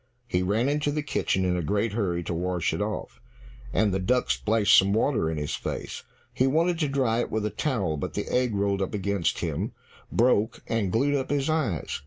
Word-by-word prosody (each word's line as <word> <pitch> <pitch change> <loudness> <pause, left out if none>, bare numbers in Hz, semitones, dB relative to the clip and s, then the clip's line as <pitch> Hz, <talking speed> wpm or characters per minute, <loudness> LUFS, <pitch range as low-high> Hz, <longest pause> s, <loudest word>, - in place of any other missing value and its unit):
He 90 -7 0
ran 105 +7 +1
into 145 +1 +1
the 150 0 -2
kitchen 95 -9 0
in 90 -1 +1
a 90 - -1
great 100 +6 0
hurry 90 -6 -1
to 85 - -3
wash 90 0 -1
it - - -2
off, - - -4 0.5
and 105 - +2
the 95 - +1
duck 125 +7 +1
splashed 110 -2 +3
some 100 +1 +5
water 110 - +1
in 80 - -3
his 75 -1 -3
face. - - -4 0.3
He 130 - +2
wanted 165 +4 +2
to 155 - +1
dry 130 -5 +1
it - - -1
with 110 -1 -1
the 105 - -1
towel, 100 - -1
but - - -4
the - - -2
egg 125 -4 +1
rolled 100 0 0
up 95 - -2
against 100 -2 -1
him, - - -2 0.4
broke, 115 -2 +2
and 110 -5 -1
glued 140 +7 +2
up 135 -2 -1
his 145 +1 +1
eyes. 130 - -1
110 Hz, 215 wpm, -26 LUFS, 95-130 Hz, 0.5 s, some